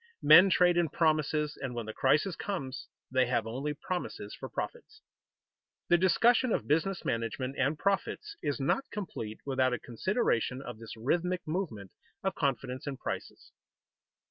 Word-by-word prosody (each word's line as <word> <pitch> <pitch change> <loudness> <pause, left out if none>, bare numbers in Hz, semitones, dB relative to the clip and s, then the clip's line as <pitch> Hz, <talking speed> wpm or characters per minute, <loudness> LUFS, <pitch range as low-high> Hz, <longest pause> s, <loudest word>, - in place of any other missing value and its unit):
Men 190 +2 +9
trade 175 -1 +4
in 170 -2 +2
promises 155 -1 +1
and 130 -3 -4
when 120 -2 -3
the 110 - -6
crisis 155 - +2
comes, 140 -10 -4 0.2
they 130 -1 +3
have 120 -3 0
only 135 +6 -3
promises 160 - -5
for - - -7
profits. - - -6 0.9
The 175 - +6
discussion 235 +7 +4
of - - 0
business 170 +5 0
management 115 +4 -2
and 140 +3 +1
profits 200 - -1
is 145 - -1
not 205 - 0
complete 130 - -6
without 130 -2 +1
a 125 - -2
consideration 125 - 0
of 120 -5 -8
this 115 0 -9
rhythmic 175 +9 -1
movement 155 - -3 0.3
of 195 - 0
confidence 130 -2 -2
and 140 -2 -3
prices. - - -6
145 Hz, 150 wpm, -30 LUFS, 125-180 Hz, 0.9 s, Men